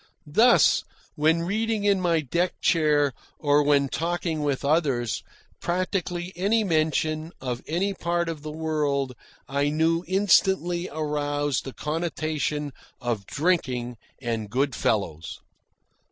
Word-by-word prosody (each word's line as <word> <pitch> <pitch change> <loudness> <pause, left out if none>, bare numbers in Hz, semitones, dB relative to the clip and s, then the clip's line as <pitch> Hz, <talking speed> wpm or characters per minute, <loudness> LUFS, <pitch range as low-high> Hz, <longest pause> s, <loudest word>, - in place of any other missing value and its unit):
Thus, 240 +6 +5 0.3
when 160 +2 +2
reading 215 +3 -1
in 200 -2 +3
my 170 -3 +2
deck 170 +6 -1
chair 150 -4 +3 0.2
or 145 -1 +3
when 145 -1 +3
talking 165 +1 -2
with 140 -2 -1
others, 140 - +1 0.4
practically 180 0 -2
any 205 +5 +2
mention 155 -2 0
of 125 -2 -4
any 185 +6 0
part 170 -1 -1
of 160 -3 -4
the 155 - -6
world 150 -4 -1 0.3
I 140 +2 +1
knew 165 +3 +1
instantly 185 -2 +2
aroused 145 -2 -1
the 135 - -6
connotation 150 -2 -2 0.3
of 120 -5 -3
drinking 130 -7 0 0.2
and 115 -4 -3
good 135 +4 0
fellows. 85 -9 -1
155 Hz, 120 wpm, -25 LUFS, 140-175 Hz, 0.4 s, Thus